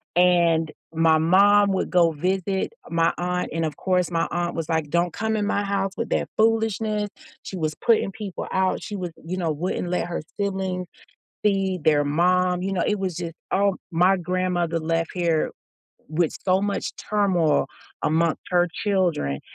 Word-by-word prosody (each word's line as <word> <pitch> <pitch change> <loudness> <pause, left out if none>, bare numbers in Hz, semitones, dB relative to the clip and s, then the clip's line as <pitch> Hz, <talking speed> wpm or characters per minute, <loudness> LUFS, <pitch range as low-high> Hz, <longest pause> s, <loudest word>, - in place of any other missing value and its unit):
and 170 -3 +3 0.2
my 160 -1 +4
mom 200 +5 +5
would 190 - -1
go 175 -2 +4
visit 190 - -1 0.2
my 165 0 +2
aunt, 180 0 -1
and 165 0 0
of 155 - -3
course 180 -2 0
my 165 -1 0
aunt 175 0 -1
was 165 -1 -4
like, 160 -3 0
"Don't 170 +1 +1
come 220 0 -1
in 210 - 0
my 205 0 0
house 195 -1 -1
with 230 - -2
that - - 0
foolishness," 220 -1 +1 0.3
she 190 - -6
was 155 -3 -2
putting 225 -4 +2
people 200 -4 -6
out, 190 0 +1
she 210 - -6
was 180 -3 -4
you 180 +3 -3
know, 170 -3 0
wouldn't 175 +3 -2
let 180 -1 -1
her 175 - -3 0.2
siblings 190 -2 -2 0.6
see 195 -2 +1
their 150 -2 +4
mom, 180 +4 +2
you 195 +1 -2
know, 180 - 0
it 210 - +1
was 185 -4 -3
just 170 -2 -5 0.2
oh, 200 -1 +2
my 180 +3 +4
grandmother 180 -2 -1
left 165 +1 -1
here 170 -3 +1 0.6
with 160 +1 0
so 185 0 +3
much 205 0 -2
turmoil 185 -7 +1 0.4
amongst 160 +1 +1
her 175 -1 +3 0.2
children, 175 - 0
180 Hz, 170 wpm, -24 LUFS, 165-195 Hz, 0.6 s, mom